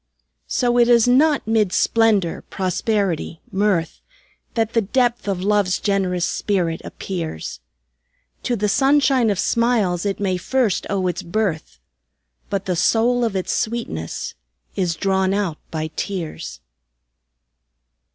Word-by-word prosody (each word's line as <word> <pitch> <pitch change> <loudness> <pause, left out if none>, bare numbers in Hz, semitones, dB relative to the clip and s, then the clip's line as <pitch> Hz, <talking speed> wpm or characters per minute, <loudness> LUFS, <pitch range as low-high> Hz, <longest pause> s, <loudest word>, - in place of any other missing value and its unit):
So 245 -1 +1
it 240 - +5
is 235 -1 +5
not 285 +4 +4
mid 220 -4 +2
splendor, 215 -5 +2
prosperity, 185 -3 -1
mirth, 190 -4 0 0.5
That 225 -1 0
the 230 - +3
depth 240 +2 0
of 190 -2 -1
Love's 205 -2 +2
generous 185 -3 0
spirit 175 -5 -1
appears; 165 - -5 0.8
To 245 - -1
the 210 -1 0
sunshine 270 +1 +3
of 200 - 0
smiles 215 -5 +1
it 200 -1 -2
may 190 -2 0
first 235 +1 0
owe 195 -2 0
its 175 -2 -1
birth, 170 - -2 0.7
But 200 -1 -2
the 180 - 0
soul 235 +7 +2
of 225 -4 -1
its 185 - -1
sweetness 215 - -3 0.4
is 175 -3 0
drawn 190 +1 +1
out 190 -7 -2
by 155 -1 -4
tears. 165 - -5
200 Hz, 125 wpm, -21 LUFS, 180-230 Hz, 0.8 s, it